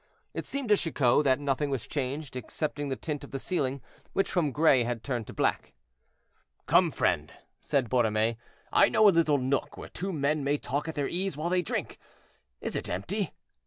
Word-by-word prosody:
It - - -4
seemed 275 -4 -2
to 210 - +7
Chicot 145 -5 +2
that 130 -1 +4
nothing 145 0 0
was 135 -4 -2
changed 140 0 -3
excepting 145 +4 -3
the 135 - -1
tint 150 +1 -4
of - - -9
the 135 - -4
ceiling, 135 -3 -1 0.3
which 195 - +1
from 165 -6 +1
gray 145 -4 +4
had 120 -1 -3
turned 120 -5 -3
to - - -8
black. - - 0 0.9
"Come, - - +5
friend," - - 0 0.3
said 135 -4 0
Borromée, 110 -2 +2 0.4
"I - - +6
know 215 - +5
a - - +8
little 165 -4 +3
nook 130 +1 -1
where - - -8
two 195 +3 -4
men 150 -2 0
may 140 +1 +1
talk 145 +2 -3
at 160 - -4
their 145 -2 0
ease 185 -3 -2
while 160 +3 -1
they 180 0 +3
drink. 175 - -4 0.6
Is - - -3
it - - -3
empty?" 180 - -2
145 Hz, 195 wpm, -29 LUFS, 130-165 Hz, 0.9 s, a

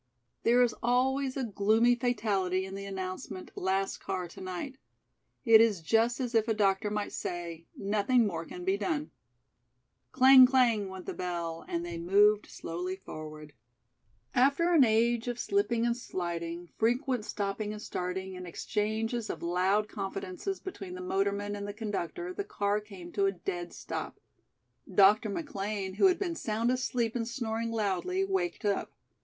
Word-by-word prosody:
There 245 +2 +5
is 240 - +1
always 260 +3 +1
a 265 - -1
gloomy 220 +2 +3
fatality 200 -7 0
in 190 - -8
the 195 0 -6
announcement, 185 -1 -6
"Last 195 +1 -1
car 185 -2 -3
to - - -11
night." 185 +9 -5 0.7
It 225 -2 +8
is 220 -5 +3
just 230 - +2
as 250 -2 -2
if 225 0 +3
a 225 - +1
doctor 200 0 +2
might 210 0 -2
say: 170 -2 -5
"Nothing 215 +4 +2
more 165 -5 -2
can 355 - -8
be 385 +1 +2
done." 305 -6 -2 1.0
Clang, 260 0 +8
clang, 235 -6 +3
went 190 -1 -8
the - - -4
bell, 170 -2 -4
and 170 0 -2
they 170 -1 -5
moved 205 +4 +4
slowly 180 +3 -5
forward. 155 -4 -9 0.8
After 280 +7 +3
an 310 -5 +7
age 230 +1 +2
of 245 -1 -2
slipping 240 - +1
and 235 0 +1
sliding, 170 -5 -4
frequent 245 +1 +1
stopping 205 0 -3
and 210 - -6
starting 190 -1 -4
and 180 0 -7
exchanges 220 +5 -2
of - - -5
loud 185 +5 +2
confidences 195 - -4
between 195 - -7
the 185 - -7
motorman 200 +2 -1
and 200 0 -5
the 205 - -5
conductor, 190 -5 -4
the 200 - -3
car 205 +1 0
came 190 -4 -11
to 200 +1 +2
a - - +2
dead 175 -1 -5
stop. - - -6 0.7
Dr. 205 +3 +5
McLean, 200 - -3
who 205 - +5
had 365 -1 +3
been 365 -4 -2
sound 230 -5 0
asleep 245 -2 -1
and 230 -2 -1
snoring 230 -2 -2
loudly, 230 - 0
waked 370 - -2
up. 200 -1 0
210 Hz, 160 wpm, -30 LUFS, 185-240 Hz, 1.0 s, It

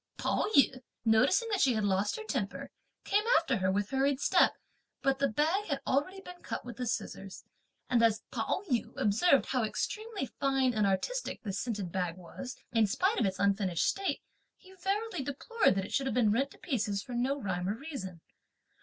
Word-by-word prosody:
Pao - - 0
yü 265 -2 +5 0.2
noticing 255 - +4
that 405 - +1
she 260 -3 +4
had 215 - 0
lost 200 +1 +1
her 445 - -6
temper, 435 - -3 0.3
came 415 +1 +2
after 295 -7 +1
her 190 -1 +1
with 200 +1 -1
hurried 270 0 +1
step, - - +4 0.5
but 270 -1 +2
the 275 - +3
bag 320 - +1
had 280 -6 -2
already 295 +9 0
been 360 -1 -11
cut - - -5
with 240 -1 -8
the 250 -1 -3
scissors; 195 -3 -4 0.4
and 240 -2 +3
as 225 -2 +3
Pao 385 - -1
yü 245 -5 0
observed 270 - +4
how 255 -3 0
extremely 410 - -3
fine 270 -1 +1
and 210 -2 +2
artistic - - -2
this 200 -2 -3
scented 210 -7 -3
bag 180 -1 -2
was, 215 +8 -8 0.2
in 225 -2 +4
spite 375 - +1
of - - +3
its 190 - -3
unfinished 195 -4 +1
state, 390 0 -1 0.3
he 380 -1 -17
verily 395 -2 -2
deplored 285 - +1
that 195 -1 -1
it - - -9
should 270 0 +1
have 240 - -1
been 230 -4 +4
rent 270 +6 +1
to - - -16
pieces 210 - -2
for 250 - -8
no 260 +4 0
rhyme 185 -5 -2
or 205 - 0
reason. 225 - -7
250 Hz, 195 wpm, -31 LUFS, 205-300 Hz, 0.5 s, yü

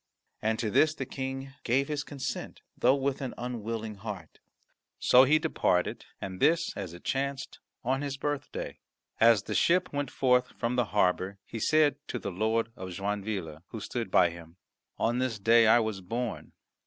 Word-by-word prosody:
And 110 +1 +1
to 110 -2 -1
this 155 +8 +4
the 135 - -4
King 135 +1 -5
gave 135 +4 +2
his 150 -1 -2
consent, 140 -3 -5
though 130 +2 +4
with 140 0 -1
an 130 - -4
unwilling 115 -3 -4
heart. 100 -6 -8 0.6
So 130 +1 +6
he 150 +4 +5
departed, 155 - 0
and 95 -1 -6
this, 165 +3 +2
as 90 -4 -6
it 85 - -13
chanced, 140 0 -2 0.2
on 130 +2 0
his 140 -1 -3
birthday. 145 0 -4 0.4
As 115 -3 +6
the - - -4
ship 180 0 +2
went 145 -2 -1
forth 125 -1 +2
from 120 +1 -1
the 125 -1 +2
harbour 95 -1 +1
he 115 - -6
said 150 +3 +3
to - - -3
the 115 - -4
Lord 110 +4 0
of 95 0 -7
Joinville, 95 -4 -3
who 110 - -7
stood 115 0 -4
by 90 -2 +4
him, 85 0 -12 0.4
"On 120 +2 +1
this 130 -4 -1
day 115 +2 +5
I 110 - +7
was 110 -4 -1
born." 115 +5 -4
115 Hz, 175 wpm, -29 LUFS, 100-135 Hz, 0.6 s, I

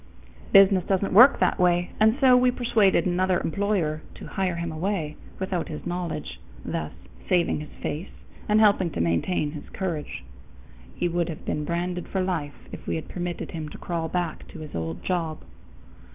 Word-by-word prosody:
Business 195 -2 +7
doesn't 195 0 +1
work 250 +8 +8
that - - +2
way, 175 0 +2
and 220 +3 +4
so 260 -3 +6
we 250 0 +5
persuaded 235 -5 +2
another 185 0 +2
employer 175 -5 0
to - - -10
"hire 185 -2 -1
him 170 -1 -3
away" 160 -2 -2 0.2
without 190 -2 -2
his 150 - -7
knowledge, 175 - -4 0.3
thus - - -3 0.4
saving 175 -4 +2
his 150 - -8
face 160 +6 -3 0.4
and 210 +1 +5
helping 200 -4 +4
to - - -3
maintain 85 - 0
his 150 -1 -9
courage. 155 - -4 0.7
He - - 0
would 175 0 -1
have 160 - -7
been 150 - -2
branded 175 +1 -2
for 190 - -2
life 165 -6 -4
if - - -9
we - - 0
had 160 - -5
permitted 175 -1 -4
him 155 -2 -5
to - - -10
crawl 165 -2 -3
back 175 -2 -3
to 165 - -10
his 155 - -9
old 80 0 -4
job. 165 -4 -2
175 Hz, 175 wpm, -25 LUFS, 160-190 Hz, 0.7 s, work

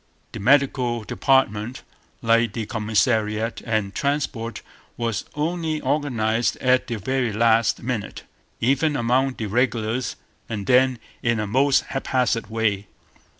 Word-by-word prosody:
The - - -7
medical 125 -1 +2
department, 120 -2 +1 0.4
like 115 0 +3
the 115 -2 -3
commissariat 110 0 0
and 110 -4 -1
transport, 140 -5 -2 0.3
was 115 -3 -2
only 160 0 -1
organized 120 -6 0
at 130 0 +2
the 120 - -2
very 125 +3 -1
last 115 +1 +2
minute, 120 -4 -4 0.4
even 140 +5 +2
among 130 +1 +1
the 110 - -4
regulars, 120 +2 0 0.3
and 105 -3 -4
then 130 +1 +4 0.2
in 120 -2 +1
a 105 - -1
most 135 +6 +3
haphazard 125 -4 -1
way. 105 -3 -1
120 Hz, 120 wpm, -23 LUFS, 110-130 Hz, 0.4 s, then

